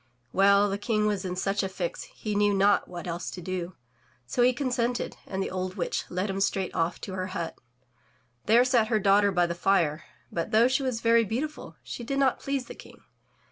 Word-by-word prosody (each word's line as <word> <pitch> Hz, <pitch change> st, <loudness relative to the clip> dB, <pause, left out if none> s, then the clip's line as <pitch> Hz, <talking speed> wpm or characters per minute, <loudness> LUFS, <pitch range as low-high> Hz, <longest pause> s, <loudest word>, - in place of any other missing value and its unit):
Well, 200 Hz, +1 st, +5 dB
the 200 Hz, 0 st, -2 dB
King 215 Hz, 0 st, 0 dB
was 205 Hz, -2 st, 0 dB
in 180 Hz, -1 st, -3 dB
such 195 Hz, +2 st, 0 dB
a 195 Hz, -, -2 dB
fix, 185 Hz, -2 st, -4 dB
he 215 Hz, -, -6 dB
knew 205 Hz, 0 st, +3 dB
not 200 Hz, +1 st, +3 dB
what 175 Hz, -1 st, -7 dB
else 175 Hz, 0 st, -4 dB
to -, -, -7 dB
do, 180 Hz, 0 st, -4 dB, 0.5 s
so 125 Hz, -, -1 dB
he 245 Hz, +1 st, +6 dB
consented, 245 Hz, -2 st, -1 dB
and 190 Hz, 0 st, -2 dB
the -, -, -4 dB
old 185 Hz, 0 st, -3 dB
witch -, -, -2 dB
led 185 Hz, +3 st, -2 dB
him 195 Hz, 0 st, -3 dB
straight 195 Hz, -1 st, 0 dB
off 165 Hz, +1 st, -1 dB
to 190 Hz, -, -6 dB
her 185 Hz, 0 st, -3 dB
hut. 170 Hz, -1 st, -4 dB, 0.9 s
There 235 Hz, +4 st, +6 dB
sat 240 Hz, -4 st, +3 dB
her 220 Hz, -1 st, +2 dB
daughter 200 Hz, 0 st, +4 dB
by 175 Hz, -2 st, +3 dB
the 170 Hz, -, -2 dB
fire, 170 Hz, -4 st, +1 dB, 0.3 s
but 170 Hz, -, -2 dB
though 225 Hz, +3 st, +5 dB
she 260 Hz, +2 st, +1 dB
was 255 Hz, -4 st, -2 dB
very 230 Hz, 0 st, +4 dB
beautiful, 260 Hz, +8 st, -4 dB
she 240 Hz, -, -7 dB
did 275 Hz, +4 st, -2 dB
not 270 Hz, -2 st, +2 dB
please 275 Hz, -2 st, -2 dB
the -, -, -9 dB
King. -, -, -15 dB
200 Hz, 215 wpm, -27 LUFS, 185-230 Hz, 0.9 s, he